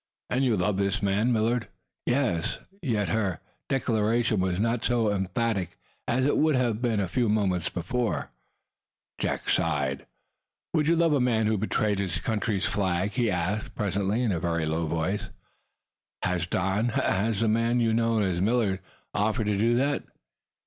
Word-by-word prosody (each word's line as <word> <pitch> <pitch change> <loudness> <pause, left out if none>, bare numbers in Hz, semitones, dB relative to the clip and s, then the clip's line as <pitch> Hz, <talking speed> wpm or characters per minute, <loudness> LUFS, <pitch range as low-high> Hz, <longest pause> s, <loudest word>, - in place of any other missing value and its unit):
"And 130 +2 +2
you 120 -5 +2
love 95 +2 +1
this 100 +1 0
man, 100 +5 +2
Millard?" 115 +1 +1 0.4
"Yes!" 120 -11 +1 0.2
Yet 110 - 0
her 100 -4 0 0.3
declaration 115 -3 +1
was 90 -1 0
not 115 +2 0
so 115 -4 +2
emphatic 95 -1 -1 0.3
as 130 +2 +1
it 145 - +2
would 155 -2 +3
have 120 -3 +1
been 115 -4 +1
a 100 - 0
few 120 +4 0
moments 95 -5 +1
before. 115 +7 -2 0.9
Jack - - -2
Benson - - +2
sighed. 70 -4 -1 0.7
"Would 155 -3 +2
you 165 - +4
love 165 -2 +3
a 145 - +3
man 115 -3 +2
who 110 - +2
had 110 - 0
betrayed 105 -1 0
his 90 -4 -1
country's 105 -1 -1
flag?" 95 0 0
he 120 -2 +1
asked, 95 +3 -2
presently, 100 +3 0
in 115 - +1
a 85 - 0
very 85 -1 -1
low 80 +1 -1
voice. 95 +5 -2 0.9
"Has 90 -3 0
Don 95 +7 0
has 110 -1 0
the 115 - +2
man 115 +2 +2
you 115 -1 +2
know 115 -1 +2
as 90 -3 0
Millard 105 -3 +1 0.3
offered 110 +2 0
to 105 -1 +1
do 115 +4 +2
that?" 140 +3 +1
105 Hz, 170 wpm, -27 LUFS, 95-120 Hz, 0.9 s, you